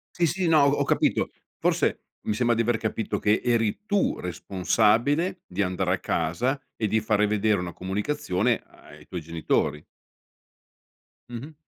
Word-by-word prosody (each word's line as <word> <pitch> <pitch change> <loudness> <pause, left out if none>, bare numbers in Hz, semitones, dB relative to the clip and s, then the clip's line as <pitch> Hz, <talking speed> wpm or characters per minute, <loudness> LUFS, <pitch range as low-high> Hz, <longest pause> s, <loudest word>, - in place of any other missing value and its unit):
Sì, 175 - +2
sì, 175 +3 0
no, 155 -3 +6
ho 140 +1 +3
capito. - - +1 0.3
Forse, - - +1 0.2
mi 105 - -1
sembra 120 +2 +2
di 115 0 +1
aver 120 0 +1
capito 110 -1 -2
che 105 +1 +2
eri 115 - 0
tu 205 -2 +1
responsabile 115 - +1
di - - -2
andare 90 -1 0
a 95 - -1
casa 120 - -1
e 110 - -1
di 110 +2 +2
fare 105 -1 +2
vedere 105 -2 +1
una 85 -1 -4
comunicazione 105 - -1
ai - - -17
tuoi 90 -2 -5
genitori. 80 -2 -1 1.5
Mh-mh. 130 +6 -7
110 Hz, 150 wpm, -26 LUFS, 95-135 Hz, 1.5 s, no